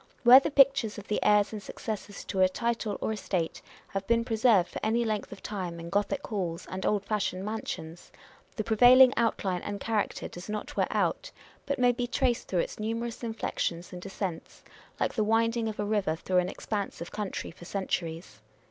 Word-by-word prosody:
Where 250 +2 +10
the 275 - -2
pictures 275 -6 +4
of 205 - -9
the 210 - -1
heirs 210 +1 +4
and 210 - -5
successors 205 0 -6
to 190 - -2
a, 185 - +6
title 230 0 -2
or 220 - 0
estate 185 -5 -2 0.3
have 195 0 -4
been 230 0 +2
preserved 220 -5 +3
for - - -6
any 230 +2 +1
length 215 -2 -2
of - - -10
time 180 -5 -4
in 170 0 -8
Gothic 205 +1 0
halls 180 -6 -3
and 190 0 -2
old 205 -2 +1
fashioned 195 -3 -1
mansions, 175 -6 -6 0.4
the 215 - -2
pre 220 +1 -1
vailing 255 +2 +8
outline 195 -6 0
and 205 0 -5
character 215 0 -1
does 175 +3 -10
not 210 0 -4
wear - - +2
out, - - -1 0.4
but 280 0 0
may 250 -1 +4
be 245 0 -2
traced 245 -1 0
through 180 -3 +1
its - - -6
numerous 230 +2 -3
inflections 180 -7 -3
and 180 - -7
descents, 190 -3 -6 0.4
like - - 0
the 220 - +1
winding 230 +1 +2
of 215 - -7
a 205 - 0
river 205 -6 0
through 180 +2 +1
an 180 0 0
expanse 205 0 -4
of 170 - -7
country, 210 -3 -4
for 175 +1 -13
centuries. 170 -3 -3
210 Hz, 195 wpm, -29 LUFS, 185-230 Hz, 0.4 s, Where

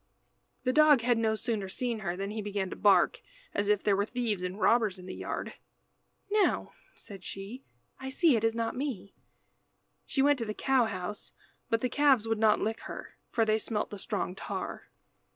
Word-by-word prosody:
The 255 - +1
dog 300 -3 +6
had 240 0 +2
no 220 -1 +2
sooner 215 -4 -2
seen 240 +2 -2
her 180 -3 -3
than 195 +1 -3
he 215 0 -3
began 200 -2 -3
to - - -4
bark, 195 -4 +4 0.3
as 205 - 0
if 210 -1 +2
there 205 -2 +3
were 200 +2 0
thieves 230 -6 -1
and 185 +3 -4
robbers 220 -5 +3
in 180 - -11
the 185 - -6
yard. - - -5 0.8
"Now," 420 -1 +2 0.2
said 195 -3 -11
she, 200 +9 -7 0.4
"I 265 0 -5
see 300 +1 +4
it 225 - 0
is 225 0 +2
not 230 0 -1
me." 250 -8 -4 0.9
She 270 - +1
went 290 -1 +4
to 230 - -1
the 215 -1 -4
cow 265 -3 +3
house 210 0 -5 0.4
but 230 - +1
the 250 - +1
calves 270 -5 +3
would 225 -1 0
not 215 -1 +4
lick 220 +1 -1
her, - - -8 0.2
for 225 -2 +2
they 215 0 +2
smelt 215 -1 -2
the 205 - -6
strong 200 -3 -2
tar. 195 - -6
220 Hz, 195 wpm, -30 LUFS, 200-245 Hz, 0.9 s, dog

